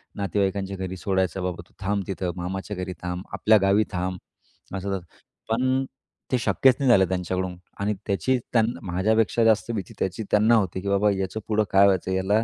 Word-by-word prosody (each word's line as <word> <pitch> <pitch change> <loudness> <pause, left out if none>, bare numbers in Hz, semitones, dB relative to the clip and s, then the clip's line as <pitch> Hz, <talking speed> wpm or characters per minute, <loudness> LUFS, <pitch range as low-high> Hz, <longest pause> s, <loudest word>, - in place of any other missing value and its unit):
नातेवाईकांच्या 100 -1 -1
घरी 95 0 -5
सोडायचं, 95 -1 -1
"बाबा, 90 -2 -3
तू - - -29
थांब 100 0 0
तिथं 95 -2 -2
मामाच्या 95 +3 -4
घरी 90 0 -4
थांब. 90 +1 -3
आपल्या 110 0 +4
गावी 100 +2 +4
थांब." 90 0 -2 0.6
असं-तसं 95 -2 -3 0.4
पण 130 +3 +1 0.5
ते 130 - +3
शक्यच 130 +2 +4
नाही 135 -2 +2
झालं 95 -5 +6
त्यांच्याकडून 90 0 -2 0.2
आणि 100 +1 0
त्याची 100 +6 +1 0.2
त्यांना 115 0 +2
माझ्यापेक्षा 110 +5 +2
जास्त 110 +1 +3
भीती, 100 -6 -4
त्याची 95 +4 -2
त्यांना 110 +3 +5
होती, 95 -4 0
की 100 - -6
बाबा 100 +1 +3
याचं 95 +2 -2
पुढं 110 0 +2
काय 100 +1 +6
व्हायचं? 95 -1 +2
याला 95 +4 +2
100 Hz, 175 wpm, -25 LUFS, 95-110 Hz, 0.6 s, झालं